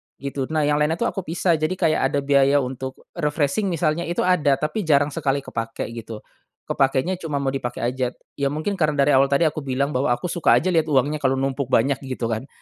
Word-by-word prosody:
gitu. 135 -1 -4
Nah, 155 -1 0
yang 145 0 +2
lainnya 150 +2 +2
tuh - - -3
aku 195 - -4
pisah 170 0 +1
jadi 155 +4 0
kayak 160 -4 +1
ada 140 0 -1
biaya 140 0 +4
untuk 130 +1 -6 0.2
refreshing 150 +6 0
misalnya 165 -1 0
itu 175 - -1
ada 155 -7 +3
tapi 155 +6 -3
jarang 145 -1 +3
sekali 140 0 -1
kepake 115 0 -5
gitu. 115 -2 -8 0.4
Kepakenya 135 +7 0
cuma 155 -4 -4
mau 135 - 0
dipake 125 -3 -4
aja 125 0 -1 0.2
ya 140 - +2
mungkin 155 +7 -3
karena 150 -2 +2
dari 140 +1 +3
awal 135 0 +5
tadi 140 +4 +2
aku 155 -1 +1
bilang 140 0 -1
bahwa 130 -2 +1
aku 175 +8 -5
suka 175 - +3
aja 185 +2 +1
lihat 160 -2 +2
uangnya 145 +1 +1
kalo 135 -1 +1
numpuk 135 0 -2
banyak 135 +2 +2
gitu 120 -3 -3
kan, 115 +5 -3
140 Hz, 215 wpm, -22 LUFS, 135-155 Hz, 0.4 s, awal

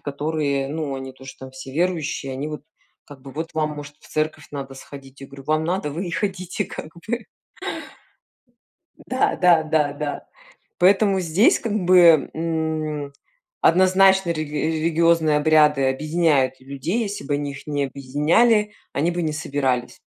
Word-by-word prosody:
которые, 145 -1 -2
ну, 150 -2 -3
они 130 0 -6
тоже 130 +1 -11
там 130 0 -9
все 130 0 -10
верующие, 160 -5 -1
они, 135 +3 -4
вот, 150 -2 -6 0.4
как 140 -2 -13
бы: 135 0 -11
"Вот 160 +2 -5
вам, 155 -1 0
может, 145 0 -9
в - - -18
церковь 155 0 -2
надо 135 -2 -6
сходить". 135 0 -12
Я 135 - -8
говорю: 135 0 -12
"Вам 155 +1 +1
надо, 175 -2 -1
вы 175 +6 -4
и - - -4
ходите, 185 -1 -2
как - - -8 0.2
бы". 235 0 -2 1.7
Да, 255 +1 0
да, 175 -3 +5
да, 150 -2 +1
да. 145 0 -5 0.5
Поэтому 195 +1 +4
здесь, 175 +6 +3
как 225 -3 -3
бы, 175 -4 +6
м, 155 -3 -2 0.5
однозначно 190 0 +4
религи 155 -2 -3
религиозные 160 0 +2
обряды 150 -3 +4
объединяют 150 -2 +1
людей. 140 - -3
Если 205 -6 -4
бы 145 - -1
они 145 0 -2
их 140 +1 -11
не 145 -2 -1
объединяли, 160 - +2 0.2
они 160 +5 +1
бы 175 0 -2
не 155 -1 -1
собирались. 135 -5 -2
155 Hz, 155 wpm, -22 LUFS, 140-170 Hz, 1.7 s, бы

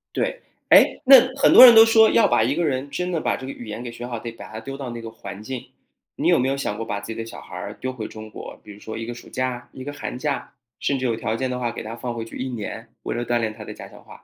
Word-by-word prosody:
对。 - - -2 0.3
诶， - - +6
那 260 -1 +7
很 275 - +4
多 - - +11
人 240 -2 +9
都 225 0 +10
说 225 -1 +6
要 230 - +4
把 - - +3
一 130 +5 0
个 170 +1 0
人， 135 -1 -2
真 180 +5 -3
的 165 -3 -1
把 - - 0
这 130 - -8
个 135 - -5
语 120 - -10
言 110 +3 -6
给 120 - -6
学 120 +1 -8
好， 120 -1 -4
得 115 +1 -6
把 115 - -11
他 110 - -7
丢 135 +4 -7
到 135 -3 -6
那 120 0 -7
个 115 0 -8
环 105 -2 -9
境。 125 +2 -6 0.5
你 - - -1
有 - - +4
没 125 - +1
有 135 - 0
想 120 -7 -2
过 115 - -4
把 105 -2 -3
自 100 - -8
己 115 - -5
的 115 - -4
小 115 - -9
孩 - - -11
儿 - - -6
丢 130 - -4
回 110 -4 -6
中 110 0 -10
国。 - - -9
比 105 - -12
如 100 - -15
说 110 +1 -7
一 115 - -5
个 120 - -5
暑 120 - -12
假， 130 -1 -3
一 130 - -9
个 145 - -5
寒 145 - -6
假， 140 +1 -3 0.3
甚 140 - 0
至 130 - -3
有 115 -2 +1
条 110 0 -2
件 130 +2 -2
的 125 - -3
话 120 -2 -1
给 - - -7
他 110 +1 -7
放 120 +1 -5
回 115 - -4
去 115 - -9
1 130 - -4
年， 115 -1 -6 0.2
为 - - -3
了 120 0 -3
锻 120 0 +1
炼 110 -2 -2
他 110 0 -10
的 - - -7
家 - - -10
乡 - - -15
话。 - - -15
120 Hz, 345 characters per minute, -23 LUFS, 115-135 Hz, 0.5 s, 多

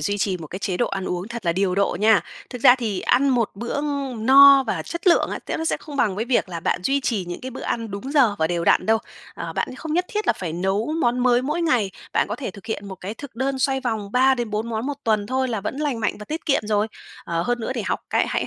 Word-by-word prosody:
duy 205 +7 -1
trì 195 -2 0
một 165 - -9
cái 180 - -7
chế 190 -2 -2
độ 240 - +1
ăn 195 -1 -4
uống 180 +3 -3
thật 235 -2 -7
là 170 - +3
điều 185 +1 0
độ 200 -2 +1
nha. 220 0 +5 0.3
Thực 250 -2 -7
ra 250 - +8
thì 220 -7 -2
ăn 270 +3 +3
một 240 -5 +2
bữa 235 +7 -3
ng 275 -6 -3
no 275 0 +8
và - - -2
chất 340 +3 -7
lượng 345 - +4
á - - -3
sẽ - - -1
v - - -5
sẽ - - +1
không 295 -2 -10
bằng 215 -8 +1
với 220 - -1
việc 240 -6 +1
là 170 -2 -5
bạn 180 - 0
duy 275 +5 +2
trì 220 -8 -1
những 175 0 -6
cái 260 - -6
bữa 255 - -8
ăn 230 -2 -3
đúng 200 +8 -6
giờ 255 -9 +4
và 160 - +2
đều 170 0 -1
đặn - - +3
đâu. 225 0 +4 0.4
À, - - -6
bạn - - -1
thì - - -8
không 315 +2 -5
nhất 355 +3 +2
thiết 425 0 -3
là - - +4
phải 170 -3 -5
nấu 195 - -1
món 240 -2 +2
mới 245 0 +3
mỗi 305 +6 -1
ngày, 240 -12 +2 0.2
bạn - - +2
có 210 - -3
thể 250 -6 -4
thực 200 +1 -14
hiện 205 -3 -4
một 190 - -6
cái 200 +4 -5
thực 280 +2 -10
đơn 265 +1 -1
xoay 265 0 +1
vòng 220 -5 -3
3-4 240 -4 +2
món 225 +2 -3
1 290 - -3
tuần 215 -2 +1
thôi 260 +2 0
là 220 -4 -2
vẫn 210 - -4
lành 285 -5 -2
mạnh 215 - 0
và 210 - -8
tiết 315 +6 -6
kiệm 275 -7 +2
rồi. 210 0 +1 0.4
Ờ, 170 0 -1
hơn 240 +5 -1
nữa 240 - -2
thì 230 - -2
học 200 - -2
cái - - +2
hãy - - -1
230 Hz, 295 wpm, -23 LUFS, 200-265 Hz, 0.4 s, ra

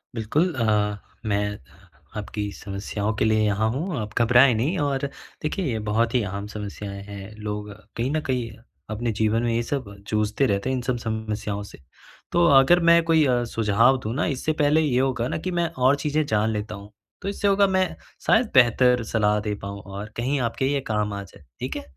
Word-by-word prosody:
बिल्कुल 150 - +1
अ, 105 -4 +1 0.3
मैं 105 0 -1 0.6
आपकी 105 -1 -4
समस्याओं 100 +2 -4
के 110 - +1
लिए 110 0 +3
यहाँ 105 +2 +1
हूँ 155 +4 -3
आप 105 0 -5
घबराएँ 120 +2 +6
नहीं 140 - 0
और 140 -2 0 0.4
देखिए 175 +4 -1
ये 110 - -2
बहुत 115 +2 +1
ही 120 - +4
आम 100 +2 -5
समस्याएँ 100 -1 -6
हैं। 100 0 -9
लोग 105 0 -5 0.3
कहीं 120 +3 0
न 155 0 0
कहीं 120 -3 -1 0.4
अपने 115 +2 -2
जीवन 110 +2 +2
में 115 -1 +1
ये 115 - +1
सब 125 -6 -4
जूझते 105 +5 +1
रहते 100 +4 0
हैं 130 - +1
इन 125 - -2
सब 125 0 -1
समस्याओं 110 -2 -3
से। 100 - -12 0.5
तो 175 0 +4
अगर 175 +7 +5
मैं 170 0 +7
कोई 160 -2 +4
अ, 120 -2 +2
सुझाव 115 +3 +3
दूँ 110 +2 -2
ना 150 - +1
इससे 155 +1 -1
पहले 150 +1 +3
ये 130 -5 +1
होगा 130 -2 0
न - - -3
कि 185 - -3
मैं 170 -2 0
और 130 +2 +4
चीज़ें 150 +1 0
जान 110 -2 +1
लेता 105 0 -4
हूँ 100 +1 -11 0.3
तो 195 - -5
इससे 200 0 -1
होगा 200 0 +4
मैं 190 -1 +2 0.4
शायद 225 0 +4
बेहतर 125 -1 +5
सलाह 105 -1 +1
दे 105 - -1
पाऊँ 100 0 -6
और 100 +2 -7
कहीं 135 +4 0
आपके 120 +3 -1
ये 140 0 +1
काम 105 -1 -1
आ 100 - -4
जाए। 80 - -17 0.2
ठीक - - -4
है? - - -5
115 Hz, 200 wpm, -24 LUFS, 105-140 Hz, 0.6 s, मैं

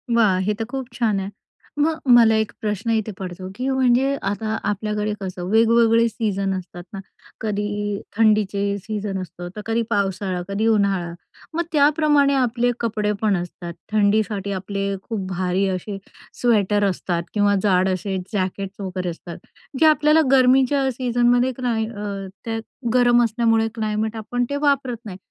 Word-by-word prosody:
वाह! 215 -5 +4
हे 210 - +1
तर 225 - -1
खूप 260 +2 -5
छान 220 -5 0
आहे. 195 0 -4 0.5
मग 315 +2 +1
मला 230 -2 +6
एक 220 -1 0
प्रश्न 215 +2 -2
इथे 220 -1 0
पडतो, 185 0 -6
की 255 +5 -3
म्हणजे 265 +1 +2
आता 215 +2 -2
आपल्याकडे 210 +1 -2
कसं 185 -2 -5
वेगवेगळे 230 +1 +4
सीजन 200 -4 -1
असतात 175 -1 -7
ना, 195 - -5 0.4
कधी 205 -1 -2 0.2
थंडीचे 210 -3 +3 0.2
सीजन 205 -3 -3
असतो, 175 0 -8
तर 210 - -5
कधी 225 +1 0
पावसाळा, 195 -2 -1
कधी 205 +3 0
उन्हाळा. 200 -6 +1 0.4
मग 340 +2 0
त्याप्रमाणे 295 -1 +4
आपले 245 -1 +1
कपडे 215 -2 -1
पण 210 -2 +2
असतात. 175 0 -6 0.2
थंडीसाठी 205 -1 +1
आपले 195 +1 -3
खूप 205 -5 -4
भारी 185 +1 0
असे 195 +2 -5 0.4
स्वेटर 210 -4 +2
असतात 175 -2 -2
किंवा 205 -1 +3
जाड 190 -2 +3
असे 190 +1 -2 0.2
जॅकेट्स 195 0 -3
वगैरे 185 -2 -3
असतात, 170 0 -8 0.4
जे 320 - +5
आपल्याला 305 0 +5
गर्मीच्या 265 +1 +4
सीजनमध्ये 245 0 +2
क्लाय 235 -4 0
अ, 205 -3 -5 0.2
त्यात 225 -1 -3 0.3
गरम 240 -1 +5
असल्यामुळे 225 -1 +2
क्लायमेट 215 0 -2
आपण 245 +3 -2
ते 285 - -1
वापरत 270 -4 +1
नाही. 190 -4 -7
215 Hz, 150 wpm, -22 LUFS, 195-240 Hz, 0.5 s, मला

